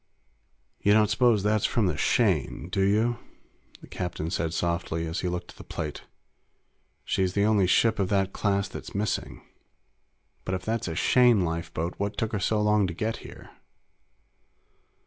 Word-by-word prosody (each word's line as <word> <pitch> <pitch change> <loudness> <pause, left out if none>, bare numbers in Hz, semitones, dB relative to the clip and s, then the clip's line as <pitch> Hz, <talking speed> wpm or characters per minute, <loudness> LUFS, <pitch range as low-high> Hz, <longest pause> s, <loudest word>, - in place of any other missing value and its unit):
"You 100 - +4
don't 105 -1 +4
suppose 110 -2 +3
that's 105 0 +2
from 115 - +1
the 90 - 0
Shane, 90 - +1
do 95 - -1
you?" 110 +5 +2 0.6
the - - -13
captain 90 -3 -4
said 80 -4 -1
softly 85 0 -2
as 80 +3 -3
he 90 - -2
looked 90 0 -4
at - - -19
the - - -10
plate. 75 -3 -6 1.0
"She's 95 -1 0
the 100 - +2
only 105 -4 +3
ship 110 +4 +3
of 95 -2 0
that 95 -1 +1
class 100 -1 0
that's 95 - -9
missing. 105 0 -2 1.0
But 95 - -2
if 90 - -6
that's 115 -2 -1
a 80 - -3
Shane 120 -1 +4
lifeboat, 85 0 -3
what 100 0 -2
took 110 +1 -1
her 105 - -1
so 110 +2 +1
long 105 -2 +3
to 85 - -5
get 110 +5 -2
here?" - - -12
100 Hz, 165 wpm, -27 LUFS, 90-105 Hz, 1.0 s, You